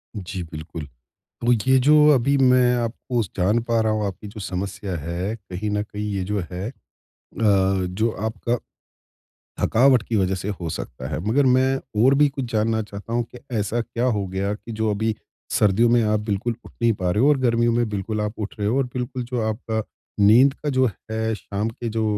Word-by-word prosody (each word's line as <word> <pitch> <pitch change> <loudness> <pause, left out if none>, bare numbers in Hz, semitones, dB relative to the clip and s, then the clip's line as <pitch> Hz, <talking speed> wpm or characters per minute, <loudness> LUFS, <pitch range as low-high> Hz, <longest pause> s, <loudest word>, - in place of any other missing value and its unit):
जी, 95 -2 -5
बिल्कुल। 80 -1 -7 0.6
तो, 120 - +2 0.2
ये 130 - +6
जो 150 +4 +5 0.2
अभी 140 +2 +2
मैं 125 -1 +4
आपको 120 +1 -2 0.2
जान 100 +6 +3
पा 115 -1 +1
रहा 110 -1 +1
हूँ, 105 -1 -1
आपकी 100 +2 -5
जो 105 +1 -9
समस्या 95 0 -4
है 85 +7 -3
कहीं 100 -1 -5
न 105 0 0
कहीं 105 0 -6
ये 95 -2 -1
जो 105 +2 -1
है 90 +4 -4
अ, - - -9 1.2
जो 110 +6 0 0.2
आपका, 110 +2 -1 1.1
थकावट 125 0 +4
की 115 - 0
वजह 95 -1 +2
से 95 +2 -4
हो 85 - -3
सकता 65 -3 -6
है। 75 - -3
मगर 135 +6 +3
मैं 130 - +4 0.4
और 135 - +6
भी 145 +1 +5
कुछ 135 -1 -4
जानना 110 0 +1
चाहता 100 +2 -8
हूँ, 120 0 +2
कि 125 - -13 0.2
ऐसा 105 +3 -1
क्या 120 +1 -3
हो 105 -6 +1
गया 95 +2 -2
कि 115 +2 -9
जो 110 0 0
अभी 110 +2 0 0.4
सर्दियों 105 +3 +4
में 120 0 +4
आप 105 -1 +1
बिल्कुल 105 +2 -2
उठ - - -12
नहीं 115 -1 +4
पा 90 -3 -1
रहे 105 +7 +1
हो 140 - +5
और 150 -2 +4
गर्मियों 120 -2 +2
में 120 -1 +1
बिल्कुल 105 +1 -3
आप 105 +1 -3
उठ 105 -2 -4
रहे 105 0 0
हो 120 - +1
और 135 - +2
बिल्कुल 125 0 -3
जो 125 0 -3
आपका 110 0 -2 0.4
नींद 120 +7 +6
का 150 - -2
जो 130 -1 +3 0.2
है, 110 0 -1
शाम 105 +1 -3
के 115 +1 -5
जो 110 0 -1
110 Hz, 205 wpm, -23 LUFS, 100-120 Hz, 1.2 s, ये